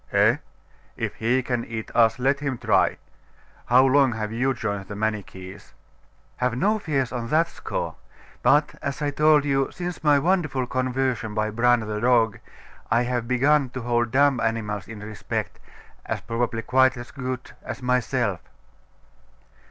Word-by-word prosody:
'Eh? - - +4 0.6
If - - -3
he 125 +3 +1
can 120 -2 -1
eat 110 -1 -6
us, 115 -1 +4
let 135 +2 +1
him 140 -3 -2
try. - - +2 0.7
How 125 +2 +6
long 135 -2 +4
have 110 -1 -4
you 125 +4 +1
joined 100 -6 -3
the 105 - -7
Manichees?' 105 -3 -5 0.6
'Have 125 -1 0
no 215 +10 +2
fears 140 - -1
on 120 -2 -4
that 160 +6 +3
score. - - -4 0.5
But, 145 +5 +3
as 140 -1 -3
I 145 - 0
told 150 0 +4
you, 135 -1 +1
since 180 -2 -6
my 150 -2 +5
wonderful 155 -5 +1
conversion 130 -3 -1
by 110 0 0
Bran, 120 +2 +3
the 105 -1 -4
dog, 115 -3 +3 0.5
I 120 +2 +3
have 120 -1 -2
begun 135 +2 +3
to - - -3
hold 120 0 0
dumb 140 0 +3
animals 110 -4 -2
in 110 -2 -9
respect, 105 0 -5 0.5
as - - -2
probably 115 0 -2
quite 130 0 +3
as 120 +1 -9
good 130 -2 -5
as 135 - -7
myself. 125 -5 0
125 Hz, 155 wpm, -24 LUFS, 115-135 Hz, 0.7 s, How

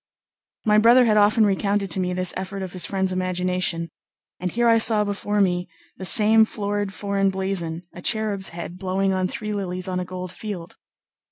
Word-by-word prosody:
My 210 -1 +4
brother 240 +3 +6
had 215 -2 +2
often 210 +1 +4
recounted 200 -1 0
to 190 - +5
me 180 -1 -1
this 185 0 0
effort 190 +1 -5
of 185 - -7
his 185 - +1
friend's 190 -1 -1
imagination, 180 -2 -1 0.5
and 180 - -2
here 240 +1 +1
I 230 0 +5
saw 220 -1 +3
before 205 0 -2
me 180 -2 0 0.3
the 190 - -5
same 220 +3 +7
florid 205 -2 -3
foreign 200 0 -1
blazon, 190 -3 -3
a 180 - -10
cherub's 210 -2 -1
head 175 +1 -8
blowing 190 +1 -1
on 185 -1 0
three 215 +1 -5
lilies 185 -2 -4
on 185 -1 -2
a - - -2
gold 185 -1 -7
field. 185 -5 -8
195 Hz, 185 wpm, -22 LUFS, 185-210 Hz, 0.5 s, same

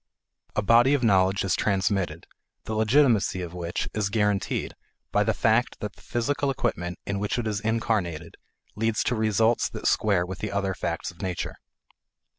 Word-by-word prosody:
A 110 - +1
body 120 +6 +5
of 135 - -1
knowledge 95 -2 +3
is 90 - +2
transmitted, 95 -5 0 0.4
the 110 - -4
legitimacy 110 -4 +3
of 85 -1 -7
which 85 -1 -3
is 105 -2 0
guaranteed 105 -2 0 0.4
by - - +3
the - - +2
fact - - +1
that - - -5
the - - -19
physical 140 +4 -1
equipment 90 -9 -2
in 100 0 -2
which 105 +3 -1
it 120 - -2
is 105 -2 -1
incarnated 105 -7 -1 0.4
leads 110 0 0
to 125 - 0
results 110 +1 +2
that - - -8
square 100 -5 +2
with 95 +1 -7
the 105 - -3
other 100 -1 -1
facts 85 -1 -3
of 85 - -15
nature. 90 -2 -3
100 Hz, 170 wpm, -26 LUFS, 95-110 Hz, 0.4 s, body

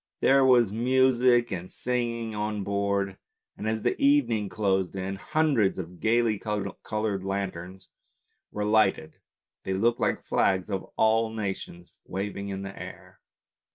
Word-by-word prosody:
There 135 0 +5
was 120 -5 +5
music 125 +1 +3
and 90 0 -5
singing 120 -2 -2
on 105 -1 -2
board, 100 -1 -1 0.4
and 110 - -5
as 110 -1 -2
the - - +1
even 140 -3 +4
ing 105 -3 -1
closed 95 -3 0
in, 95 0 -3
hundreds 145 -6 +1
of 90 -1 -7
gaily 110 -2 +2
coloured 105 -1 -3
lanterns 95 -1 -4 0.6
were 105 0 -2
lighted 105 -7 +2 0.2
— - - -66
they 95 - -2
looked 115 +5 +1
like - - 0
the - - -32
flags 95 +1 +1
of 95 -1 -3
all 110 0 +3
nations 95 -5 -5
waving 100 +1 -4
in 95 0 -4
the 95 0 -7
air. - - -10
105 Hz, 150 wpm, -27 LUFS, 95-115 Hz, 0.6 s, There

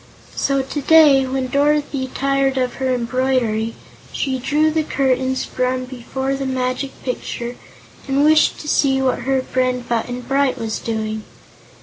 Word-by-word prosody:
So 275 -1 +1
today, 285 -1 +5
when 260 0 -1
Dorothy 285 -1 +1
tired 275 0 0
of 255 -1 0
her 260 -1 +1
embroidery, 240 -2 0 0.4
she 265 -2 -2
drew 300 +5 +2
the 315 0 +1
curtains 260 -3 0
from 255 0 -1
before 265 +2 -4
the 275 0 -3
Magic 255 +1 -1
Picture 245 -1 -4 0.5
and 275 +1 +2
wished 310 0 +4
to 300 - -9
see 270 -2 +2
what 265 -1 +1
her 265 -1 +2
friend 255 -1 -1
Button 245 +1 -2
Bright 270 +2 +1
was 220 -1 -3
doing. 220 -1 -3
260 Hz, 140 wpm, -20 LUFS, 250-275 Hz, 0.5 s, today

